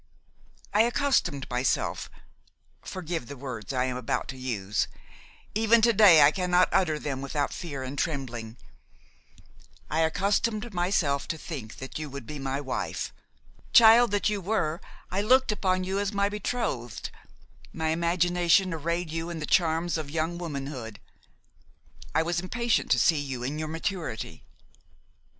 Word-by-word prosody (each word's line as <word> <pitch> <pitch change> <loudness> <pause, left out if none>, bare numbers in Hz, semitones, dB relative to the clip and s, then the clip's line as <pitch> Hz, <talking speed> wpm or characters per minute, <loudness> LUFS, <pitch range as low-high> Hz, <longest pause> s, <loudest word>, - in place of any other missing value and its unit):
I 210 - +5
accustomed 240 - +1
myself–forgive 160 +5 -4
the 140 - -8
words 125 -4 -6
I 130 -1 +1
am 125 -1 -2
about 125 - -2
to 130 - -5
use; 110 -6 -2 0.7
even 225 +2 +4
to 235 0 +5
day 195 -8 +8
I 145 - +7
cannot 180 0 +2
utter 160 -5 +2
them 135 -3 -4
without 140 +1 -2
fear 140 -7 -5
and 130 +2 -5
trembling–I 120 - -7
accustomed 210 +7 0
myself 175 -6 0
to 165 - -3
think 135 -9 -7
that 130 +3 -7
you 155 -1 -5
would 140 -3 -8
be 150 +3 -7
my 135 0 -2
wife; 135 -3 -3 0.6
child 235 +1 +8
that 205 0 +1
you 210 -2 -1
were, 175 -5 -1 0.3
I 190 +2 0
looked 255 +3 +4
upon 185 -3 0
you 190 +2 -1
as 205 0 -1
my 200 -1 +1
betrothed; 205 - -3 0.6
my 160 -1 -2
imagination 175 +2 +2
arrayed 170 +1 -2
you 165 +1 -3
in 170 - -5
the 155 - -3
charms 165 -1 +1
of 150 -2 -6
young 165 +3 -2
womanhood; 135 -9 -5 1.2
I 160 - +4
was 170 +1 -1
impatient 235 +6 0
to 125 - +4
see 155 +5 +4
you 135 -4 -4
in 145 +4 -3
your 155 - -3
maturity. 165 +2 -4
165 Hz, 145 wpm, -27 LUFS, 140-190 Hz, 1.2 s, day